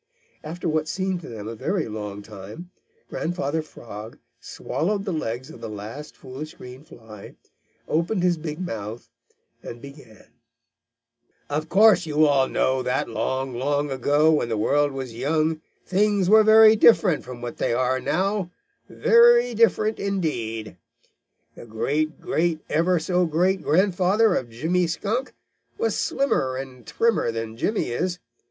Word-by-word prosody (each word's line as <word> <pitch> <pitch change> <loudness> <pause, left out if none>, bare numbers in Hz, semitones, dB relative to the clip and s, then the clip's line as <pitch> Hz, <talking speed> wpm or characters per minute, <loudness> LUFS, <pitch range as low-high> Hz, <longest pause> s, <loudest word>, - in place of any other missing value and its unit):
After 165 +3 -5
what 155 -1 0
seemed 185 0 -2
to - - -10
them 110 -3 -7
a 115 - -5
very 170 - -2
long 105 -2 -6
time, 105 - -10 0.4
Grandfather 160 -2 -2
Frog 110 -7 -10 0.2
swallowed 200 +4 -3
the 190 - -2
legs 130 -1 -4
of 175 - -13
the - - -6
last 110 +8 -8
foolish 140 +4 -9
green 125 +3 -11
fly, 110 -7 -13 0.5
opened 170 +4 0
his 180 -1 +3
big 155 0 -6
mouth, 115 - -6 0.5
and 120 - -9
began: 140 -5 -14 1.2
"Of 155 +2 -2
course 200 -2 +5
you 155 0 +3
all 140 -3 +3
know 130 0 0
that 125 0 -1
long, 130 0 -2
long 145 +3 -1
ago, 145 +4 +3
when 150 -6 +1
the 110 - -1
world 145 +7 +2
was 130 -3 -6
young, 155 +6 0 0.2
things 200 0 +1
were 220 0 +7
very 220 0 +7
different 205 -6 +4
from 125 -1 -9
what 120 0 -7
they - - 0
are 130 +2 +1
now, 185 +7 -1 0.4
very 240 - +5
different 220 -1 +2
indeed. 120 - -3 0.8
The - - -12
great 150 +8 -2
great 165 -1 -1
ever 175 +3 +2
so 180 +2 +1
great 180 +4 +1
grandfather 190 +5 +2
of 125 -7 -2
Jimmy 165 +10 0
Skunk 215 +10 -3 0.4
was 460 +2 0
slimmer 135 - 0
and 130 -2 -8
trimmer 230 - +1
than 115 -1 -5
Jimmy 205 - -1
is. 175 +8 -2
155 Hz, 145 wpm, -24 LUFS, 125-185 Hz, 1.2 s, were